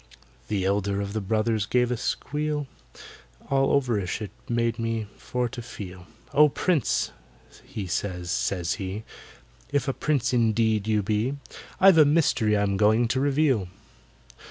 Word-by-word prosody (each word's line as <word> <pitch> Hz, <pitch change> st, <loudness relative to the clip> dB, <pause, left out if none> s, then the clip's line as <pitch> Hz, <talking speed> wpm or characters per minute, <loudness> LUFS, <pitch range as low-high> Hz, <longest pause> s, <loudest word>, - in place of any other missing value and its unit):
The 100 Hz, -3 st, -1 dB
elder 100 Hz, 0 st, 0 dB
of 100 Hz, 0 st, -4 dB
the 110 Hz, -, -2 dB
brothers 110 Hz, +1 st, 0 dB
gave 125 Hz, +1 st, +2 dB
a -, -, +1 dB
squeal, 150 Hz, +4 st, -2 dB, 0.9 s
All 135 Hz, 0 st, +3 dB
overish 110 Hz, -9 st, -2 dB
it 105 Hz, -2 st, -6 dB, 0.2 s
made 115 Hz, 0 st, 0 dB
me 115 Hz, -1 st, -2 dB
for 125 Hz, -1 st, -2 dB
to 120 Hz, -, -7 dB
feel; 95 Hz, -6 st, -9 dB, 0.3 s
"Oh, 150 Hz, +1 st, +6 dB
PRINCE," 155 Hz, -, 0 dB, 0.5 s
he 105 Hz, -, -6 dB
says, 90 Hz, -1 st, -3 dB
says 90 Hz, -3 st, 0 dB
he, 95 Hz, +3 st, -4 dB, 0.7 s
"If 145 Hz, -1 st, 0 dB
a 135 Hz, -, +1 dB
Prince 135 Hz, -4 st, 0 dB
indeed 110 Hz, -2 st, +2 dB
you 105 Hz, -1 st, +2 dB
be, 110 Hz, +7 st, 0 dB, 0.4 s
I've 190 Hz, -3 st, +7 dB
a 155 Hz, -, +8 dB
mystery 140 Hz, -8 st, +2 dB
I'm 100 Hz, -1 st, +1 dB
going 110 Hz, +3 st, +4 dB
to 130 Hz, -, +1 dB
reveal! 135 Hz, -, +2 dB
110 Hz, 145 wpm, -26 LUFS, 100-135 Hz, 0.9 s, a